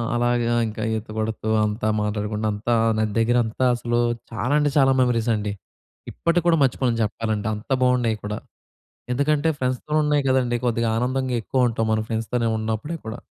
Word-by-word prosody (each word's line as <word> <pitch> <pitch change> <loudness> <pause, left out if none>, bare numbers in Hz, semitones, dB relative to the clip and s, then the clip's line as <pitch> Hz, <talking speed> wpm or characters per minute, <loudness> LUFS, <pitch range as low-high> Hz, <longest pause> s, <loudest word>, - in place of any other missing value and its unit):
అలాగే 120 0 +1 0.2
ఇంకా 110 0 -5
ఈత 110 - -7
కొడుతూ 110 0 -2 0.2
అంతా 105 +1 -2
మాట్లాడుకుంటూ 105 +1 -2
అంతా 115 +3 0 0.2
నది 110 -1 0
దగ్గరంతా 120 +1 +1
అసలు 120 0 -1 0.3
చాలా 120 +5 -1
అంటే 145 -1 +1
చాలా 135 -1 +5
మెమోరీస్ 120 -2 +1
అండి. 105 -1 -3 0.6
ఇప్పటికి 170 0 +1
కూడా 165 -2 +4
మర్చిపోలేను 125 -3 +1
చెప్పాలంటే. 110 -1 -2
అంత 105 - -11
బాగున్నాయి 125 -3 +2
కూడా. 105 +1 -3 0.7
ఎందుకంటే, 145 +4 +1
ఫ్రెండ్స్‌‌తో 130 +3 -2
ఉన్నాయి 150 -1 +2
కదండీ! 125 -2 +2
కొద్దిగా 115 -1 +1
ఆనందంగా 130 +1 -1
ఎక్కువుంటాం 120 -2 0
మన 110 - +2
ఫ్రెండ్స్‌తో 115 +2 -2 0.2
ఉన్నప్పుడే 110 +9 -3
కూడా. 110 +2 -6
120 Hz, 150 wpm, -23 LUFS, 110-130 Hz, 0.7 s, చాలా